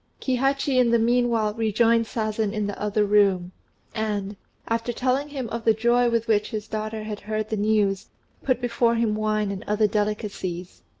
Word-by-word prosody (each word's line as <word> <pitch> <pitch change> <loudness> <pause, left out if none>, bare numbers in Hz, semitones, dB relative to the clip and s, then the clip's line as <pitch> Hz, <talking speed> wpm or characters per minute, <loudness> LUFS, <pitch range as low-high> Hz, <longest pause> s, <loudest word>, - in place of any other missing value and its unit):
Kihachi 270 +1 +1
in 245 -2 +4
the 235 - +4
meanwhile 230 -2 +2
rejoined 230 +1 +2
Sazen 215 -2 -2
in 210 -2 -1
the 205 - -5
other 210 0 +1
room, 200 -3 +3 0.4
and, 210 -2 -2 0.3
after 230 +1 -1
telling 260 +4 0
him 270 -4 -4
of 230 0 -4
the 220 -1 +4
joy 240 +2 +3
with 230 -1 0
which 210 -2 +2
his 215 -1 -5
daughter 215 0 -4
had 215 -1 -5
heard 215 0 -3
the 220 - -1
news, 205 -2 +1 0.3
put 255 -3 +1
before 235 -1 +1
him 230 -2 +1
wine 215 -1 0
and 200 +1 -6
other 210 +1 +2
delicacies. 205 -4 -3
220 Hz, 175 wpm, -24 LUFS, 210-235 Hz, 0.4 s, in